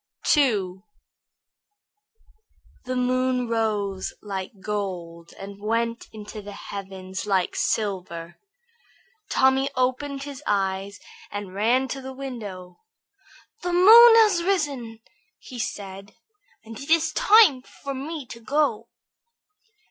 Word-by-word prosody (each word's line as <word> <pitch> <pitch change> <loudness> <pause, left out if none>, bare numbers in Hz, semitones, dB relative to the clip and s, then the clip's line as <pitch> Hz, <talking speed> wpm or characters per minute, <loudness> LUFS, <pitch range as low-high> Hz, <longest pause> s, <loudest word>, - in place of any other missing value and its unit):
II 200 -10 +1 2.0
The 255 0 -3
moon 255 0 0
rose 210 -4 -2
like 195 0 -6
gold 180 -5 -5
and 200 +1 -10
went 230 +2 -1
up - - -27 0.3
in 210 - -6
the 205 0 -9
heavens 190 -1 -7
like 190 -3 +1
silver. 180 -5 -2 0.9
Tommy 265 +1 +3
opened 265 +2 -1
his 285 -1 -8
eyes 195 0 -1 0.3
and 205 -2 -6
ran 240 +6 +2
to 270 - -5
the 265 0 -7
window. 210 -10 -8 0.8
"The 355 0 -2
moon 450 +6 +9
has 425 -6 +5
risen," 280 - -2 0.4
said 200 -5 -6
he, - - -30 0.5
"and 225 0 -9
it 275 - -9
is 325 0 +3
time 430 - +6
for 275 +2 -8
me 285 +2 -6
to 235 -1 -10
go." 235 -2 0
230 Hz, 110 wpm, -24 LUFS, 195-275 Hz, 2.0 s, moon